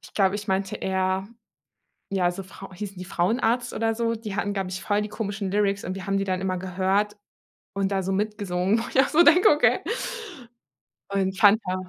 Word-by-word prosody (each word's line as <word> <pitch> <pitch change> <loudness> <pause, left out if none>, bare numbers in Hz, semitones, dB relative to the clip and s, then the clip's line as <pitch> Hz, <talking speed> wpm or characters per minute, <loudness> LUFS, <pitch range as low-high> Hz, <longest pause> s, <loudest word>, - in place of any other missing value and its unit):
Ich - - -11
glaube, 195 -1 +3
ich 210 0 -5
meinte 190 -1 -1
eher, 190 0 -1 0.8
ja, 185 -3 +1
so, 195 +2 -6
Frau 190 +1 -12
hießen 195 0 -7
die 185 - -6
Frauenarzt 230 +7 0
oder 225 0 0
so? 230 0 -1
Die 215 -3 -6
hatten, 205 0 -1
glaube 195 -2 -2
ich, 185 +1 -5
voll 205 0 +1
die 210 - -3
komischen 205 -2 -4
Lyrics 200 -1 +1
und 185 - -3
wir 195 0 -7
haben 195 0 +1
die 195 - 0
dann 185 -1 -1
immer 185 -1 -1
gehört 190 +3 0 0.6
und 195 0 -1
da 195 -1 +1
so 190 - -3
mitgesungen, 200 0 0
wo - - -3
ich - - +1
auch 270 - +5
so 320 - +5
denke, 355 +4 +6
okay. 295 - +3 1.3
Und 190 -1 -1
Fanta 205 -3 +4
195 Hz, 200 wpm, -25 LUFS, 190-210 Hz, 1.3 s, denke